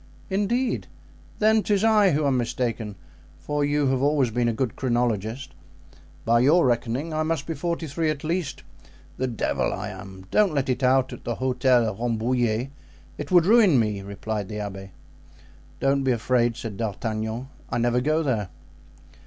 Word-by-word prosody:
"Indeed! 235 +6 0 0.5
Then 220 +1 +4
'tis 205 -1 +1
I 215 -5 +5
who 150 +1 +1
am 135 -2 +2
mistaken, 115 -3 -2 0.4
for 150 0 -2
you 145 0 +1
have 130 -1 +1
always 140 -4 +2
been 120 +1 +1
a - - +2
good 115 0 -2
chronologist. 120 0 -1 0.7
By 115 +1 +4
your 150 +7 +5
reckoning 125 +6 -1
I 155 - 0
must 155 -2 -1
be 165 - -3
forty 170 +2 -3
three 160 +2 -1
at 155 -2 -3
least. 165 -2 -2 0.5
The 130 - -1
devil 120 -3 -1
I 95 +2 -4
am! 95 -1 -10
Don't 200 -7 +3
let 135 -2 0
it 130 +1 0
out 130 0 +3
at 125 - -10
the 120 - -2
Hotel 125 -1 +2
Rambouillet; 120 +2 0 0.5
it 150 - -5
would 175 -2 +5
ruin 205 - +5
me," 105 -3 0
replied 100 +1 -5
the 105 - -6
abbé. 95 -2 -6 0.9
"Don't 135 0 +2
be 130 -1 +2
afraid," 120 0 +1
said 110 -5 -6
D'Artagnan. 110 +3 -3 0.2
"I - - -1
never 120 +1 +2
go 155 +4 +1
there." 110 -9 -1
130 Hz, 165 wpm, -25 LUFS, 115-150 Hz, 0.9 s, I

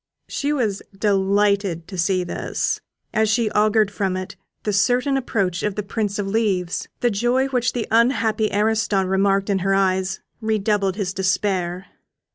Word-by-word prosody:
She 285 +1 -2
was 225 -9 0 0.2
delighted 200 -3 +1
to 190 - -7
see 185 +1 +1
this, 175 - -2 0.3
as 220 0 +2
she 220 0 +1
augured 215 -1 +3
from 195 -2 -1
it 185 0 -6 0.3
the 210 - -1
certain 250 +7 +2
approach 200 -9 -1
of 210 -2 -1
the 210 - -2
Prince 205 0 -2
of 205 - -1
Leaves. 195 -4 0
The 240 - +2
joy 240 +6 +1
which 250 -2 0
the 240 -3 -2
unhappy 225 -2 +2
Ariston 210 -1 +1
remarked 195 +1 +2
in 195 - +1
her 195 +1 +1
eyes 190 -1 +1 0.2
redoubled 210 -3 +1
his 195 -3 -2
despair. 190 -2 -1
200 Hz, 155 wpm, -22 LUFS, 190-220 Hz, 0.3 s, augured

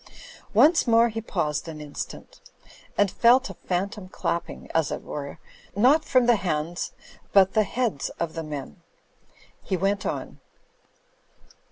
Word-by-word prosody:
Once 325 -2 +5
more 230 0 +5
he 225 0 -4
paused 165 -8 -2
an 160 -2 -7
instant; 150 -1 -8 0.6
and 205 -2 +3
felt 255 +3 +4
a - - -9
phan 180 +2 -2
tom 205 -2 -10
clapping, 170 -2 -3
as 160 -2 +2
it - - -4
were, 140 -1 -6 0.4
tiot 275 +9 +5
from 255 -4 +3
the 240 -2 +5
hands 170 -2 -2 0.4
but 195 -1 +6
the 220 - +4
heads 220 - -1
of 170 -2 -2
the 165 - -4
men. 145 - -7 0.8
He 190 - -2
went 195 +3 0
on. - - -4
195 Hz, 145 wpm, -25 LUFS, 160-230 Hz, 0.8 s, but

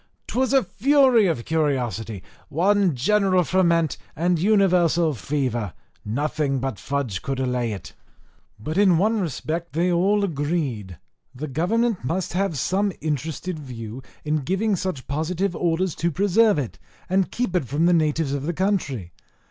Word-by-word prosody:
'Twas 260 0 0
a 270 -2 +4
fury 250 +2 +4
of 150 -9 -1
curiosity, 120 - -1 0.3
one 190 0 +2
general 190 - +3
ferment, 170 -3 +2 0.2
and 175 +2 +1
universal 175 -5 +3
fever 120 - -2 0.3
nothing 140 +4 -1
but 130 -5 -3
fudge 135 -9 -2
could 135 -1 -3
allay 125 -3 -1
it. 100 - -7 0.7
But 155 - -2
in 190 -5 +5
one 215 +5 +2
respect 165 0 -3
they 175 +3 +1
all 195 +4 +2
agreed, 145 - -2 0.4
that 140 +1 -6
government 220 - +1
must 170 +9 -2
have 195 0 0
had - - -5
some 195 +9 +1
interested 160 +3 -3
view, 120 -3 -7 0.2
in 155 +1 +1
giving 190 +9 0
such 185 -7 -4
positive 170 +6 -1
orders 175 +1 0
to 170 - +1
preserve 200 +4 +3
it, 135 -6 -4 0.3
and 190 0 +1
keep 235 -7 -2
it 175 - +1
from 145 +7 +1
the 175 - +4
natives 155 -3 +1
of 140 - -2
the 170 - 0
country. 155 - -1
165 Hz, 150 wpm, -23 LUFS, 135-190 Hz, 0.7 s, in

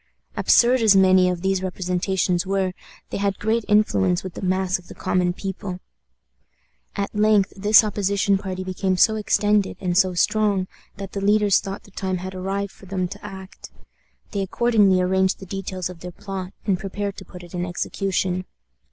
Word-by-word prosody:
Absurd 245 +1 +4
as 215 -3 +5
many 185 -1 +5
of 180 0 -3
these 190 -1 +1
representations 180 -1 -1
were, 190 -1 -1 0.4
they - - -2
had 200 -1 -1
great 220 +2 0
influence 195 -4 +2
with 185 -2 -7
the - - -8
mass 185 0 0
of 175 - -18
the - - -11
common 180 -1 0
people. 190 0 -5 1.2
At 200 0 -3
length 210 -2 +3
this 205 +2 +6
opposition 200 -1 +1
party 185 -1 -5
became 185 0 -1
so 220 +4 +4
extended 210 -1 +1
and 180 -2 -1
so 185 -1 +3
strong 205 0 +1 0.3
that 195 -1 -7
the 200 - -4
leaders 205 0 +4
thought 195 0 -7
the 200 - -18
time 190 -1 -2
had 185 +1 -6
arrived 195 +2 -3
for 195 - -17
them 185 -1 -2
to - - -10
act. 190 -2 -10 0.6
They 200 - -2
accordingly 200 -1 +3
arranged 190 +1 +1
the 190 - -10
details 190 -1 -4
of 180 -2 -10
their 180 - -7
plot, 190 -1 -6
and 195 -4 +1
prepared 200 0 -4
to - - -9
put 180 -1 -12
it 175 - -13
in 175 -1 -2
execution. 185 +1 -2
190 Hz, 180 wpm, -23 LUFS, 185-200 Hz, 1.2 s, this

